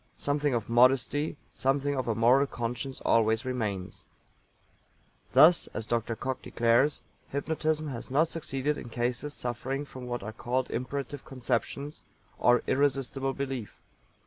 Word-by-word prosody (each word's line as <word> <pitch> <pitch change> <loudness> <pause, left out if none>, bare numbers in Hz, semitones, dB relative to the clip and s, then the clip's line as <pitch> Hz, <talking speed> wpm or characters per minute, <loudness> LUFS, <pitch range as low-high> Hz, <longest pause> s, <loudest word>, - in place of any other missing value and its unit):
Something 145 -2 0
of 115 -3 -2
modesty, 130 +5 +3 0.2
something 140 +2 +1
of 130 -2 -2
a 115 - +1
moral 125 +5 +5
conscience 125 +2 -4
always 110 +1 +3
remains. 105 -8 -3 1.3
Thus, 155 +6 +7
as 110 - -3
Dr. 115 0 -1
COCKE 130 +2 -3
declares, 120 +5 +2 0.3
Hypnotism 155 +2 -1
has 120 -4 -6
not 150 +5 +3
succeeded 150 -3 -2
in - - -8
cases 125 +5 -2
suffering 130 +4 -3
from 130 -3 -9
what 120 -3 -3
are 110 +2 -6
called 125 +3 -2
imperative 140 +2 -4
conceptions, 140 +3 -3 0.4
or 120 +1 +4
irresistible 135 -1 0
belief. 135 -5 -5
130 Hz, 130 wpm, -29 LUFS, 120-140 Hz, 1.3 s, Thus